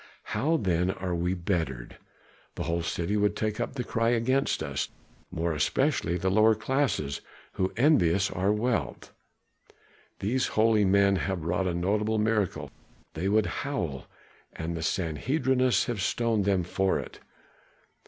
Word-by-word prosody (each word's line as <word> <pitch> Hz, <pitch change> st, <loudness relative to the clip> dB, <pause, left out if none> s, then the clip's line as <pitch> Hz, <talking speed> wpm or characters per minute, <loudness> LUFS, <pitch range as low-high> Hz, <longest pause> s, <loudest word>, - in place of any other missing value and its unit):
"How 160 Hz, +4 st, +2 dB
then 90 Hz, -, +1 dB
are 95 Hz, -2 st, -3 dB
we 90 Hz, +2 st, 0 dB
bettered? 80 Hz, -9 st, -3 dB, 0.6 s
The -, -, -3 dB
whole 85 Hz, 0 st, -1 dB
city 85 Hz, +4 st, -2 dB
would 105 Hz, 0 st, +2 dB
take 110 Hz, -1 st, -2 dB
up -, -, -2 dB
the 125 Hz, -2 st, -3 dB
cry 115 Hz, -1 st, 0 dB
against 125 Hz, +3 st, +1 dB
us, -, -, -3 dB, 0.4 s
more 85 Hz, 0 st, -1 dB
especially 90 Hz, -, +1 dB
the 95 Hz, +2 st, 0 dB
lower 110 Hz, +2 st, +5 dB
classes 110 Hz, -, -1 dB, 0.3 s
who 95 Hz, 0 st, -1 dB
envy 120 Hz, -, +4 dB
us 95 Hz, +3 st, +1 dB
our 95 Hz, +3 st, +1 dB
wealth. 105 Hz, -, -2 dB, 1.0 s
'These 125 Hz, +7 st, 0 dB
holy 110 Hz, -1 st, +4 dB
men 100 Hz, 0 st, +4 dB
have 95 Hz, -4 st, -3 dB
wrought 90 Hz, +3 st, 0 dB
a 90 Hz, -, -1 dB
notable 105 Hz, +5 st, 0 dB
miracle,' 105 Hz, -3 st, 0 dB, 0.4 s
they 90 Hz, +5 st, -2 dB
would 105 Hz, +1 st, +3 dB, 0.2 s
howl, 85 Hz, -, -3 dB, 0.5 s
'and 80 Hz, +1 st, -4 dB
the 80 Hz, -, -4 dB
Sanhedrists 125 Hz, -, +1 dB
have 115 Hz, -6 st, -3 dB
stoned 115 Hz, 0 st, 0 dB
them 95 Hz, -3 st, +2 dB
for 95 Hz, +2 st, 0 dB
it. -, -, -7 dB
100 Hz, 145 wpm, -28 LUFS, 85-115 Hz, 1.0 s, lower